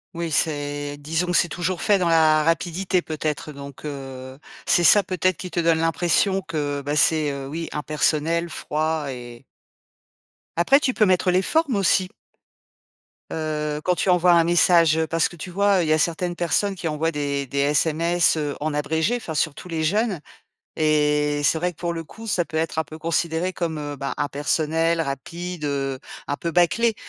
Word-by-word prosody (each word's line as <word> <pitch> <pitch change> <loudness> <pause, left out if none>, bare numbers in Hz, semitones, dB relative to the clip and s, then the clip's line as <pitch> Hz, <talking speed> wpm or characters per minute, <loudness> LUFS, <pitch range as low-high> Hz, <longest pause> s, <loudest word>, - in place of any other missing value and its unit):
Oui, 170 -1 -3
c'est 145 -1 -1
disons 165 +4 -2
que 175 - -1
c'est 175 - +2
toujours 180 +1 -3
fait 205 -2 +3
dans 175 -2 +1
la 155 -2 +4
rapidité 175 +3 0
peut-être 155 -1 -3
donc, 140 +1 -10
heu, 135 -2 -7 0.3
c'est 175 - +3
ça 200 +4 +6
peut-être 185 -1 0
qui 180 - -7
te 175 - -1
donne 165 -1 +3
l'impression 175 +4 +1
que, 145 -4 -3
bah, 145 +1 -2
c'est, 155 0 +3
heu, 140 -1 -6
oui 165 +4 -5
impersonnel, 155 +2 0
froid 155 0 -2
et 120 0 -10 1.1
après 270 +12 +4
tu 260 -4 0
peux 215 - +3
mettre 185 -1 +2
les 185 - +3
formes 300 - +1
aussi 185 -1 +2 1.2
heu, 150 -1 -2
quand 180 - +2
tu 190 - -1
envoies 180 0 +4
un 170 -1 +5
message, 170 -2 +4
heu, 160 - +1
parce 165 0 +1
que - - -12
tu 175 +2 -8
vois, 200 +1 +3
heu, - - +2
il 160 - -2
y 155 - +5
a 155 - +2
certaines 175 +2 -1
personnes 185 +4 0
qui 175 -3 -4
envoient 160 +2 -1
des 140 -2 -2
des 140 +2 -3
SMS, 160 +4 +2
heu, 145 -2 -2
en 150 0 -2
abrégé, 160 +10 0
enfin 170 -9 -6
surtout 155 +3 -2
les 160 -2 -2
jeunes 205 +2 0 0.6
et 150 -1 +2
c'est 160 - +3
vrai 180 +2 0
que 165 - -18
pour 170 -1 -2
le 165 -1 -4
coup 225 +8 -12
ça 185 -5 +1
peut 160 - -7
être 160 0 0
un 160 - -2
peu 155 +2 -11
considéré 165 +3 -1
comme, 165 -3 -3
heu, 145 -1 -5
bah, 140 +1 -4
impersonnel, 155 +3 0
rapide, 165 +4 -5
heu, 135 -2 -2 0.3
un 145 - -1
peu 170 - -3
bâclé. 195 +7 +2
160 Hz, 190 wpm, -23 LUFS, 150-175 Hz, 1.2 s, ça